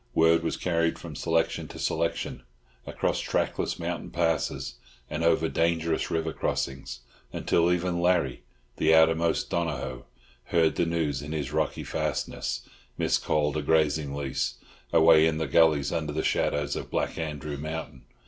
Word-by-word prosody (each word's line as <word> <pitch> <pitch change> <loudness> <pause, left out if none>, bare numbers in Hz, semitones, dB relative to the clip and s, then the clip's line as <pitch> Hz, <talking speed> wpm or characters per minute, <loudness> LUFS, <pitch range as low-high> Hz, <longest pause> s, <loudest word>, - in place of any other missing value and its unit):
Word 80 +1 +5
was 80 - -2
carried 85 -2 0
from - - -9
selection 80 -1 0
to - - -10
selection, - - -2 0.5
across - - -1
trackless - - -1
mountain - - -4
passes, - - -1 0.3
and 80 +2 -2
over 85 - +3
dangerous 85 0 0
river 80 -1 -1
crossings, 65 -3 -3 0.3
until 85 +1 +2
even 90 0 0
Larry, 85 -7 +2 0.4
the 80 +1 +4
outermost 80 +1 +3
Donohoe, 70 -7 -2 0.4
heard 80 -2 +3
the 85 - 0
news 80 -4 -1
in 75 +2 -6
his 75 -2 -3
rocky 80 -1 -1
fastness, - - -3 0.3
miscalled 75 0 +1
a - - 0
grazing 75 -1 +1
lease, 65 -4 -2 0.4
away 80 0 +6
in 80 -1 0
the 80 - -1
gullies 80 -4 +3
under 75 -3 -2
the 80 - -1
shadows 75 0 0
of - - -5
Black - - -2
Andrew 75 -2 -4
mountain. 80 -2 -6
80 Hz, 145 wpm, -27 LUFS, 75-85 Hz, 0.5 s, away